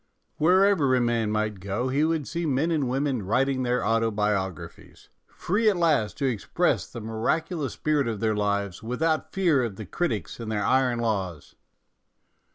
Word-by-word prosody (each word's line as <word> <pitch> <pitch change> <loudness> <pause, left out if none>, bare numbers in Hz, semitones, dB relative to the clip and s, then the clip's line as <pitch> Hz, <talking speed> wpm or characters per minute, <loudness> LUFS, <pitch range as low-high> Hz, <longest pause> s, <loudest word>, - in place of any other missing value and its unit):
Wherever 180 -4 +4
a - - +3
man 120 -2 +1
might 105 -1 -1
go 100 +7 -2
he 140 +3 +1
would 160 -3 0
see 170 -1 -3
men 145 +4 +1
and 145 -6 0
women 135 -2 0
writing 130 +7 +1
their 125 0 0
autobio 105 -4 +1
graphies, 80 - -13 0.2
free 215 +5 +1
at 200 - 0
last 150 -11 +1
to 140 - -1
express 120 -7 0
the - - -8
miracu 115 - -1
lous 145 -5 -3
spirit 150 -4 0
of 110 -3 -3
their 110 -1 +1
lives, 100 -2 -1
without 155 +8 -1
fear 170 -9 +2
of 115 -5 -3
the 110 - -7
critics 110 - -3
and 115 -2 -5
their 105 -2 -1
iron 130 -2 +2
laws. 95 -10 -3
125 Hz, 170 wpm, -26 LUFS, 105-150 Hz, 0.2 s, Wherever